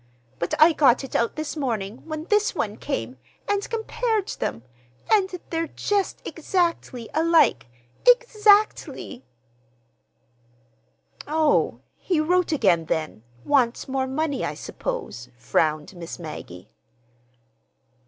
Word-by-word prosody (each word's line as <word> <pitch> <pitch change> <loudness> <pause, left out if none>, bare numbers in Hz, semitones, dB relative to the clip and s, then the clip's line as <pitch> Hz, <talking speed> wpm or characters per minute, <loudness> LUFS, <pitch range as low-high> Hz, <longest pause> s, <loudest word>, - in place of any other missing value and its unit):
But 170 - -1
I 320 +2 +7
got 270 -4 +4
it 270 - -8
out 235 - +1
this 310 0 -4
morning, 230 -7 -2
when 310 -1 -4
this 420 +4 +1
one - - -2
came, - - -4 0.3
and 405 -1 -1
compared 445 -2 -1
them; 115 - -4 0.5
and 405 -3 +4 0.2
they're 330 0 -1
just 405 +3 -2
exactly 335 - -1
alike—exactly!" 335 - +2 2.0
"Oh, 310 0 +2 0.2
he 355 -4 0
wrote 355 +3 +2
again, 185 - +3
then,—wants 160 - -1
more 265 0 -1
money, 285 +1 -1
I - - -2
suppose," 445 - -5
frowned 155 +6 0
Miss 170 -1 -7
Maggie. 120 - -9
300 Hz, 105 wpm, -24 LUFS, -, 2.0 s, I